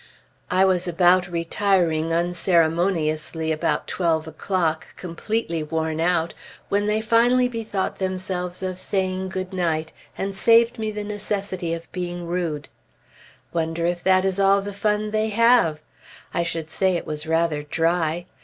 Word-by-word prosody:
I 185 +1 +4
was 185 -1 +2
about 180 +1 +4
retiring 170 -2 +1
unceremoniously 165 -2 +1
about 155 - 0
twelve 160 -3 0
o'clock, 160 0 -2
completely 175 0 -3
worn 160 +1 -2
out, 170 0 +1 0.4
when 205 +1 +1
they 215 +1 +1
finally 240 +3 +4
bethought 225 -5 -3
themselves 185 -1 -3
of 185 -1 -3
saying 190 -1 -1
good 185 0 -4
night, 160 -3 -1 0.2
and 195 +1 -2
saved 230 +4 +4
me 220 -1 -1
the 210 0 -4
necessity 200 -4 -3
of 165 0 -11
being 175 -1 -4
rude. 170 -5 -2 0.9
Wonder 165 0 -1
if 175 0 -1
that 185 0 +4
is 190 0 0
all 195 0 +4
the 205 0 -5
fun 210 +1 0
they 215 0 +1
have? 220 -9 +3 0.5
I - - +1
should 165 -2 -3
say 190 0 +1
it - - -6
was 150 +1 -5
rather 165 -2 +1
dry. 165 +2 0
180 Hz, 145 wpm, -23 LUFS, 165-195 Hz, 0.9 s, I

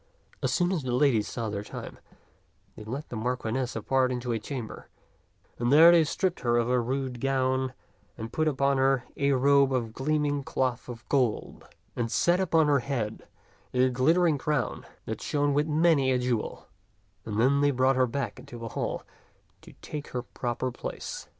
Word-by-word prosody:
As - - 0
soon 180 0 +1
as 180 -5 0
the 130 -2 -3
ladies 125 -5 +3
saw 115 -1 -4
their 100 -1 -3
time, 105 - -8 0.8
they - - -9
led 130 +8 -5
the - - -6
Marchioness 125 +2 -2
apart 130 -1 +1
into 125 -1 -3
a 115 - -1
chamber, 120 0 -7 0.7
and 120 +1 +1
there 160 +4 +9
they 170 -1 +6
stripped 185 +3 -1
her 120 -1 +1
of 120 -1 +1
her 125 -1 +2
rude 130 0 -3
gown 130 -1 0 0.4
and 115 +1 -7
put 155 0 +1
upon 140 -2 +1
her 135 -1 +3
a 140 0 +2
robe 140 +1 +4
of 120 -4 -1
gleaming 145 +1 0
cloth 130 -2 -2
of 120 -1 -9
gold, 125 -6 -1 0.3
and 115 -2 -2
set 175 - +3
upon 165 -4 +3
her 145 -1 +3
head 120 -5 -4 0.5
a 130 +1 +4
glittering 155 +5 +3
crown 145 -4 -2 0.2
that - - -5
shone 145 -1 0
with 145 +2 +1
many 155 -3 +3
a 130 - +3
jewel, 125 -3 -2 0.6
and 110 -1 -3
then 140 +4 +3
they 145 - +4
brought 130 0 +2
her 130 0 +3
back 115 -4 -4
into 120 - -10
the 115 -1 -6
hall - - -3 0.6
to - - -14
take 150 -1 -6
her 125 -1 -4
proper 125 +1 -3
place. 120 - -6
130 Hz, 180 wpm, -28 LUFS, 120-145 Hz, 0.8 s, there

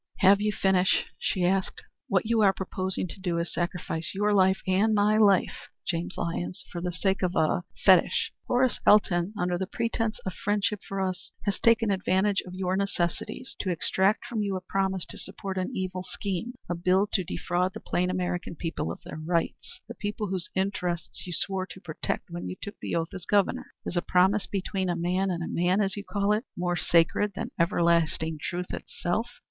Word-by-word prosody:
"Have 195 +1 +6
you 210 0 +2
finished?" 190 -2 +3
she 180 -2 0
asked. 190 +1 0 0.2
"What 190 0 +2
you 225 0 +2
are 195 -2 +6
proposing 190 0 -3
to - - -10
do 175 -3 -1
is 170 0 -1
to - - -8
sacrifice 175 -1 -3
your 205 +1 +2
life 190 -1 +4
and 200 +4 +3
my 210 +1 +4
life, 200 -3 +3 0.2
James 175 0 -2
Lyons, 175 +2 -3
for 175 - -4
the 180 0 -1
sake 190 +2 0
of 180 -1 0
a - - 0
er 160 +3 +2 0.2
fetish. - - +5 0.2
Horace 250 0 +2
Elton, 185 -3 +5
under 180 -2 0
the 190 - -2
pretence 225 0 -1
of 190 - -2
friendship 205 +1 0
for 195 0 -4
us, 185 -1 -3
has 200 -1 -1
taken 230 -2 +4
advantage 195 +1 +2
of 180 - -8
your 185 0 0
necessities 195 +5 -2
to 190 - -1
extract 190 +4 +1
from 225 -3 -2
you 200 -2 -1
a 185 - -3
promise 190 -1 -1
to - - -9
support 190 0 -4
an 185 - -1
evil 185 -1 -3
scheme 200 +5 -4
a - - -1
bill 185 +4 +2
to 190 - +2
defraud 180 +2 -1
the - - -5
plain 180 +1 0
American 180 -2 -2
people 160 - -3
of - - -9
their - - -7
rights 165 +1 -2
the - - -6
people 210 -1 -3
whose 185 -2 -2
interests 185 -3 -2
you 175 - -4
swore 190 +1 -1
to 190 - -10
protect 170 0 -4
when 175 +1 -4
you - - -5
took 205 - -8
the - - -3
oath 165 0 -1
as 180 -3 -7
Governor. 200 -2 +2 0.2
Is - - -4
a 175 - +2
promise 190 +4 +3
between 195 -1 -2
man 185 +3 +1
and 170 -2 -3
man, 180 +3 +2
as 195 -2 +1
you 205 - -5
call 205 0 +1
it, 215 +3 -1
more 175 0 0
sacred 175 +4 +3
than - - -4
everlasting 165 -2 +2
truth 180 0 -4
itself? 220 +7 -2
185 Hz, 195 wpm, -28 LUFS, 175-200 Hz, 0.2 s, Have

